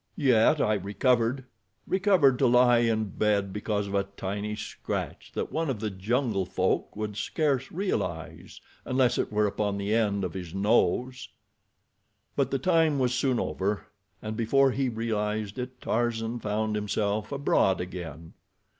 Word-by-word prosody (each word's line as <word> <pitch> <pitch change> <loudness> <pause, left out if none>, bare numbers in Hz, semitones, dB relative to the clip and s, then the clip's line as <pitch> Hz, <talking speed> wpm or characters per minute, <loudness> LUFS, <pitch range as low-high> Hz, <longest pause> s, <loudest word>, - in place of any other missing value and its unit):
Yet 135 +2 +4
I 110 - +2
recovered—recovered 125 - +1
to 135 - +4
lie 120 0 +5
in 110 -3 +1
bed 100 -2 0
because 105 -1 -1
of 100 - -6
a 100 0 +1
tiny 105 +2 -3
scratch 110 +1 -5
that - - -3
one 160 -1 -1
of 125 -6 -2
the 105 -1 -2
jungle 105 +2 0
folk - - -1
would 105 -1 -4
scarce 135 +2 -1
realize 95 - -3 0.2
unless 130 -2 +1
it - - -1
were 105 0 +2
upon 100 0 -1
the 100 +1 -1
end 105 -3 +1
of 90 -3 -3
his 90 -2 -7
nose." 120 +5 +1 1.1
But 135 -2 +1
the 135 - 0
time 160 0 +2
was 125 -2 +1
soon 125 0 +1
over, 100 +2 -2 0.3
and 110 0 -4
before 135 +4 +3
he 130 0 0
realized 110 -2 -2
it 125 0 -6
Tarzan 115 0 -1
found 110 0 -1
himself 105 +1 -1
abroad 140 -8 +2
again. 85 -3 -7
110 Hz, 145 wpm, -27 LUFS, 100-125 Hz, 1.1 s, lie